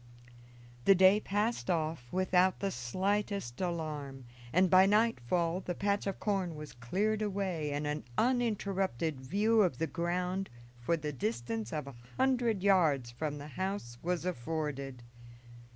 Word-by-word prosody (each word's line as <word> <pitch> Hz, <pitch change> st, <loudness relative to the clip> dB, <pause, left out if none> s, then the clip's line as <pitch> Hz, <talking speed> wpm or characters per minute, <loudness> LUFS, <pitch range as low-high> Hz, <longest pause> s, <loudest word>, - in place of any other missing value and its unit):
The 195 Hz, -, +7 dB
day 190 Hz, +3 st, +6 dB
passed 210 Hz, +2 st, -1 dB
off 155 Hz, -7 st, -1 dB
without 185 Hz, 0 st, +2 dB
the 195 Hz, -1 st, -1 dB
slightest 190 Hz, -, -2 dB
alarm, 150 Hz, -7 st, -4 dB, 0.3 s
and 185 Hz, +3 st, +4 dB
by 185 Hz, +1 st, +6 dB
nightfall 180 Hz, -, +2 dB
the 180 Hz, -2 st, -4 dB
patch 200 Hz, +1 st, 0 dB
of 195 Hz, -, -3 dB
corn 190 Hz, -5 st, -1 dB
was 150 Hz, 0 st, -8 dB
cleared 200 Hz, -, -1 dB
away 190 Hz, -7 st, -1 dB
and 145 Hz, +1 st, -2 dB
an 150 Hz, 0 st, -3 dB
uninterrupted 195 Hz, -, 0 dB
view 210 Hz, -, +3 dB
of 175 Hz, -11 st, +2 dB
the 165 Hz, -, 0 dB
ground 180 Hz, +3 st, -2 dB, 0.3 s
for 165 Hz, +8 st, 0 dB
the 150 Hz, -1 st, -4 dB
distance 115 Hz, -2 st, -3 dB
of 150 Hz, -3 st, -3 dB
a 140 Hz, -, -9 dB, 0.2 s
hundred 245 Hz, -6 st, +2 dB
yards 155 Hz, -11 st, +3 dB
from 145 Hz, +4 st, -3 dB
the 145 Hz, +1 st, -8 dB
house 150 Hz, -7 st, -4 dB
was 175 Hz, 0 st, -1 dB
afforded. 140 Hz, -4 st, -3 dB
175 Hz, 140 wpm, -32 LUFS, 145-195 Hz, 0.3 s, The